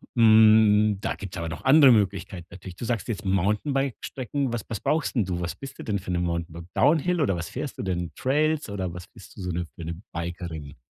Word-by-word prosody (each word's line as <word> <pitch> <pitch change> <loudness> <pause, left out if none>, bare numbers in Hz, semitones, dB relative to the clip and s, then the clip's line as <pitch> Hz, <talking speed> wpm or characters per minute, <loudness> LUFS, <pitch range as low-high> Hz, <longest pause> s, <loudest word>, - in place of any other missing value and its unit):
Hm, 110 -2 +6
da - - -1
gibt's 95 -3 -8
aber 85 0 -3
noch 80 - -8
andere 140 -1 +8
Möglichkeiten 95 -4 0
natürlich. 95 -2 -10
Du 120 - -6
sagst 115 -3 -2
jetzt 110 -2 -4
Mountainbike-Strecken, 130 - -1
was 120 -3 -3
was 110 - -4
brauchst 155 -2 0
'n 110 -6 +2
du? 90 -2 -3
Was 85 -1 -3
bist 135 +5 -10
du - - -6
denn 100 -3 -1
für 90 - -6
'ne 90 - 0
Mountainbike 85 -1 -3
Down 160 +2 +4
Hill? 175 +2 0
Oder 95 -8 +2
was 85 -1 -5
fährst 140 +1 -5
du - - -4
denn? 90 -2 -2
Trails? 150 0 0
Oder 95 -3 -3
was 90 0 -9
bist - - -16
du - - -7
so 90 -1 -3
'ne 85 +1 -2
für 85 - -8
'ne 85 +3 -6
Bikerin? 85 -4 -6
100 Hz, 225 wpm, -25 LUFS, 85-120 Hz, -, andere